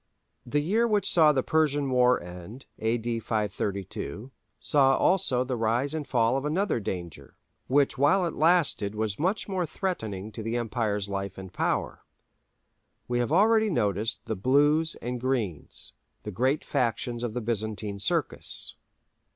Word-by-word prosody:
The 145 Hz, +4 st, +1 dB
year 215 Hz, +10 st, +2 dB
which 210 Hz, -3 st, +1 dB
saw 155 Hz, -3 st, +5 dB
the 135 Hz, -3 st, 0 dB
Persian 145 Hz, -3 st, +1 dB
War 125 Hz, 0 st, +4 dB
end 90 Hz, +8 st, -10 dB
[A.D. 115 Hz, +1 st, -1 dB
532], 105 Hz, -, -3 dB, 0.3 s
saw 135 Hz, -2 st, +4 dB
also 135 Hz, -9 st, +2 dB
the 130 Hz, 0 st, -3 dB
rise 120 Hz, +5 st, 0 dB
and 155 Hz, -2 st, -4 dB
fall 120 Hz, 0 st, +2 dB
of 135 Hz, -, -3 dB
another 165 Hz, -, 0 dB
danger, 90 Hz, -5 st, -6 dB, 0.3 s
which 140 Hz, 0 st, +2 dB
while 180 Hz, +7 st, +4 dB
it 170 Hz, -, -2 dB
lasted 155 Hz, -, +2 dB
was 105 Hz, -2 st, -2 dB
much 185 Hz, +7 st, 0 dB
more 190 Hz, -3 st, -1 dB
threatening 110 Hz, -, -4 dB
to 110 Hz, -, -7 dB
the 115 Hz, +2 st, -2 dB
Emperor's 110 Hz, -4 st, -1 dB
life 100 Hz, 0 st, -4 dB
and 95 Hz, -1 st, -9 dB
power. -, -, -2 dB, 1.0 s
We 120 Hz, 0 st, 0 dB
have 120 Hz, +2 st, -1 dB
already 220 Hz, +5 st, +4 dB
noticed 105 Hz, -, -1 dB
the 110 Hz, -, -2 dB
"Blues" 145 Hz, -, +3 dB
and 120 Hz, 0 st, -3 dB
"Greens," 115 Hz, -, -3 dB, 0.3 s
the 105 Hz, -, -5 dB
great 130 Hz, +9 st, 0 dB
factions 120 Hz, 0 st, -1 dB
of 120 Hz, -2 st, -3 dB
the 125 Hz, -, -1 dB
Byzantine 110 Hz, -2 st, -3 dB
Circus. 100 Hz, -, 0 dB
120 Hz, 150 wpm, -27 LUFS, 105-150 Hz, 1.0 s, saw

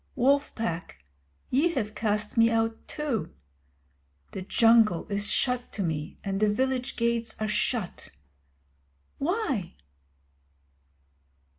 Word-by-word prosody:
Wolf 280 Hz, +3 st, +2 dB
Pack, 165 Hz, -, -4 dB, 0.5 s
ye 320 Hz, +7 st, +3 dB
have 215 Hz, -4 st, -1 dB
cast 210 Hz, -1 st, -1 dB
me 230 Hz, -1 st, +5 dB
out 225 Hz, 0 st, -1 dB
too. 295 Hz, -8 st, -3 dB, 1.0 s
The 190 Hz, -, -5 dB
Jungle 225 Hz, -2 st, +4 dB
is 205 Hz, +1 st, 0 dB
shut 250 Hz, -1 st, +1 dB
to 200 Hz, -, -2 dB
me 155 Hz, -2 st, -3 dB
and 195 Hz, -1 st, -2 dB
the 215 Hz, 0 st, +3 dB
village 255 Hz, +2 st, -1 dB
gates 235 Hz, -1 st, 0 dB
are 215 Hz, -, -1 dB
shut. 210 Hz, -1 st, -1 dB, 1.1 s
Why? 285 Hz, -, -1 dB
225 Hz, 110 wpm, -27 LUFS, 205-250 Hz, 1.1 s, me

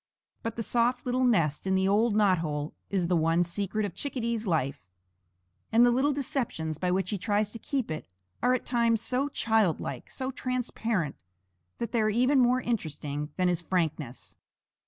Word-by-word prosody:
But 230 Hz, 0 st, -4 dB
the 230 Hz, -, -2 dB
soft 240 Hz, +3 st, +1 dB
little 255 Hz, +1 st, +1 dB
nest 170 Hz, -, +2 dB
in 190 Hz, -, +2 dB
the 190 Hz, 0 st, +2 dB
old 210 Hz, +2 st, +3 dB
knot 200 Hz, -4 st, +4 dB
hole 150 Hz, -2 st, -3 dB, 0.2 s
is 190 Hz, -3 st, 0 dB
the 180 Hz, -, +2 dB
one 165 Hz, +1 st, +3 dB
secret 200 Hz, +4 st, -2 dB
of 195 Hz, -, -5 dB
Chickadee's 235 Hz, -4 st, -2 dB
life; 145 Hz, -, 0 dB, 0.9 s
and 230 Hz, +2 st, +6 dB
the 245 Hz, -, +5 dB
little 265 Hz, +4 st, +2 dB
deceptions 245 Hz, -, -2 dB
by 180 Hz, -, 0 dB
which 185 Hz, +1 st, 0 dB
he 205 Hz, -, -2 dB
tries 205 Hz, +2 st, 0 dB
to 230 Hz, -, -7 dB
keep 260 Hz, -, -2 dB
it 155 Hz, -, -5 dB, 0.3 s
are 250 Hz, +1 st, +4 dB
at 255 Hz, -, -4 dB
times 235 Hz, -2 st, +2 dB
so 260 Hz, +5 st, 0 dB
childlike, 210 Hz, -, 0 dB
so 260 Hz, 0 st, -4 dB
transparent, 235 Hz, -, -2 dB, 0.6 s
that 235 Hz, -, -3 dB
they 235 Hz, -, +2 dB
are 215 Hz, -, +2 dB
even 255 Hz, +6 st, +3 dB
more 250 Hz, +1 st, +4 dB
interesting 150 Hz, -, -3 dB
than 185 Hz, -1 st, +2 dB
his 175 Hz, -1 st, +1 dB
frankness. 160 Hz, -7 st, -2 dB
215 Hz, 175 wpm, -28 LUFS, 170-245 Hz, 0.9 s, and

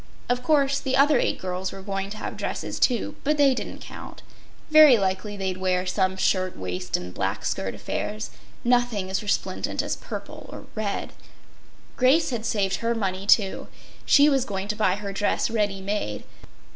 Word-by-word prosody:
Of 245 Hz, 0 st, +1 dB
course, 280 Hz, 0 st, +2 dB
the 265 Hz, -1 st, 0 dB
other 280 Hz, -1 st, +5 dB
eight -, -, 0 dB
girls 185 Hz, 0 st, -3 dB
were 195 Hz, -, -9 dB
going 195 Hz, 0 st, -3 dB
to 215 Hz, -, -7 dB
have -, -, -5 dB
dresses -, -, -4 dB
too, 245 Hz, -3 st, +1 dB
but 300 Hz, +2 st, +1 dB
they 280 Hz, -2 st, +5 dB
didn’t -, -, -6 dB
count. -, -, -10 dB, 0.5 s
Very 310 Hz, -5 st, +9 dB
likely 195 Hz, +1 st, -2 dB
they’d 190 Hz, -1 st, -2 dB
wear 185 Hz, -1 st, 0 dB
some 190 Hz, 0 st, 0 dB
shirt 185 Hz, -1 st, +1 dB
waist 90 Hz, -1 st, -3 dB
and 90 Hz, 0 st, -8 dB
black 95 Hz, +2 st, -2 dB
skirt 95 Hz, +1 st, -2 dB
affairs—nothing 215 Hz, -, -2 dB
as 190 Hz, -, 0 dB
resplendent 205 Hz, -1 st, -1 dB
as -, -, -2 dB
purple -, -, -8 dB
or -, -, -9 dB
red. 215 Hz, -2 st, -3 dB, 0.8 s
Grace 270 Hz, +5 st, +4 dB
had 230 Hz, -2 st, -2 dB
saved 195 Hz, -4 st, 0 dB
her 235 Hz, 0 st, -1 dB
money, 195 Hz, -2 st, -2 dB
too. 200 Hz, -2 st, +3 dB, 0.4 s
She 290 Hz, 0 st, +6 dB
was 275 Hz, -3 st, +3 dB
going 195 Hz, -4 st, -4 dB
to 210 Hz, -, 0 dB
buy 200 Hz, -4 st, +2 dB
her 200 Hz, -1 st, -5 dB
dress 205 Hz, +2 st, 0 dB
ready 205 Hz, -3 st, 0 dB
made. 190 Hz, -, -3 dB
205 Hz, 170 wpm, -25 LUFS, 185-245 Hz, 0.8 s, Very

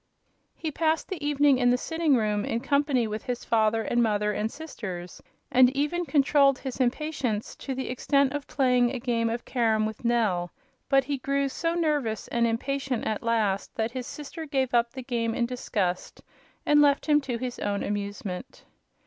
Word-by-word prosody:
He 315 Hz, -, -4 dB
passed 320 Hz, +1 st, 0 dB
the 345 Hz, -6 st, -5 dB
evening 290 Hz, -2 st, +3 dB
in 245 Hz, -1 st, +4 dB
the 245 Hz, -, +4 dB
sitting 320 Hz, +1 st, +1 dB
room, 210 Hz, -3 st, +1 dB
in 230 Hz, -, -1 dB
company 280 Hz, -3 st, +2 dB
with 215 Hz, 0 st, -4 dB
his 245 Hz, -1 st, -4 dB
father 225 Hz, 0 st, +2 dB
and 240 Hz, +1 st, +1 dB
mother 210 Hz, -2 st, +1 dB
and 210 Hz, +2 st, -2 dB
sisters, 190 Hz, -, -7 dB, 0.3 s
and 250 Hz, 0 st, +6 dB
even 345 Hz, +5 st, 0 dB
controlled 280 Hz, -2 st, +4 dB
his 260 Hz, -1 st, -6 dB
impatience 255 Hz, -4 st, -1 dB
to 270 Hz, -, -5 dB
the 265 Hz, -, -4 dB
extent 275 Hz, +2 st, +1 dB
of 290 Hz, -1 st, -4 dB
playing 250 Hz, -3 st, +3 dB
a 260 Hz, 0 st, -4 dB
game 230 Hz, -2 st, 0 dB
of 235 Hz, +1 st, -4 dB
carom 220 Hz, -3 st, +1 dB
with 220 Hz, +1 st, -6 dB
Nell; 215 Hz, -7 st, +1 dB, 0.4 s
but 270 Hz, 0 st, +4 dB
he 280 Hz, 0 st, -3 dB
grew 275 Hz, +1 st, 0 dB
so 330 Hz, +5 st, -1 dB
nervous 295 Hz, -10 st, 0 dB
and 235 Hz, -1 st, +2 dB
impatient 265 Hz, +2 st, -2 dB
at 215 Hz, -1 st, -1 dB
last 220 Hz, -4 st, 0 dB
that 225 Hz, 0 st, -1 dB
his 250 Hz, -1 st, -5 dB
sister 310 Hz, +2 st, -7 dB
gave 265 Hz, -3 st, 0 dB
up 235 Hz, 0 st, +3 dB
the 260 Hz, 0 st, -7 dB
game 230 Hz, -3 st, -1 dB
in 240 Hz, -, +1 dB
disgust 205 Hz, -7 st, -3 dB, 0.4 s
and 295 Hz, 0 st, +5 dB
left 285 Hz, -1 st, +3 dB
him 295 Hz, -1 st, +4 dB
to 255 Hz, -4 st, -3 dB
his 250 Hz, 0 st, -5 dB
own 200 Hz, 0 st, -1 dB
amusement. 205 Hz, +1 st, -5 dB
250 Hz, 185 wpm, -27 LUFS, 225-280 Hz, 0.4 s, and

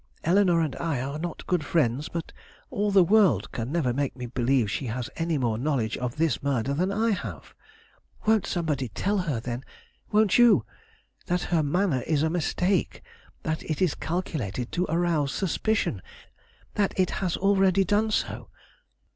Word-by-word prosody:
Eleanore 175 Hz, -1 st, +4 dB
and 155 Hz, -4 st, -1 dB
I 160 Hz, -6 st, -1 dB
are 140 Hz, +4 st, -4 dB
not 170 Hz, 0 st, -5 dB
good 180 Hz, -4 st, 0 dB
friends; 145 Hz, -3 st, 0 dB
but 170 Hz, -1 st, -5 dB, 0.4 s
all 210 Hz, -4 st, 0 dB
the 195 Hz, -2 st, +6 dB
world 180 Hz, -, +3 dB
can 120 Hz, +2 st, -4 dB
never 150 Hz, -7 st, +1 dB
make 140 Hz, +1 st, -1 dB
me 125 Hz, -1 st, -6 dB
believe 120 Hz, -2 st, +1 dB
she 130 Hz, -, -3 dB
has 120 Hz, +3 st, -4 dB
any 165 Hz, -1 st, -1 dB
more 115 Hz, -4 st, 0 dB
knowledge 125 Hz, -5 st, 0 dB
of 125 Hz, -1 st, -4 dB
this 160 Hz, 0 st, 0 dB
murder 135 Hz, -2 st, 0 dB
than 180 Hz, +7 st, 0 dB
I 220 Hz, +3 st, +1 dB
have. 200 Hz, -1 st, -5 dB, 0.7 s
Won't 220 Hz, -2 st, +3 dB
somebody 150 Hz, -7 st, -1 dB
tell 200 Hz, -, -1 dB
her, 155 Hz, -10 st, -1 dB
then 120 Hz, +2 st, -5 dB, 0.5 s
won't 215 Hz, 0 st, +4 dB
you 225 Hz, -, +6 dB, 0.6 s
that 180 Hz, 0 st, 0 dB
her 165 Hz, -, +4 dB
manner 155 Hz, -2 st, +1 dB
is 155 Hz, -2 st, +2 dB
a 160 Hz, -, +1 dB
mistake; 180 Hz, +2 st, 0 dB, 0.4 s
that 160 Hz, 0 st, -2 dB
it 155 Hz, -, -3 dB
is 180 Hz, -5 st, +2 dB
calculated 140 Hz, -, -3 dB
to 180 Hz, +1 st, -1 dB
arouse 165 Hz, -4 st, +1 dB
suspicion; 195 Hz, -, 0 dB, 0.7 s
that 200 Hz, -2 st, 0 dB
it 185 Hz, -, +2 dB
has 180 Hz, -3 st, 0 dB
already 195 Hz, -1 st, +3 dB
done 205 Hz, +4 st, +1 dB
so? 115 Hz, -, -2 dB
160 Hz, 165 wpm, -26 LUFS, 130-185 Hz, 0.7 s, the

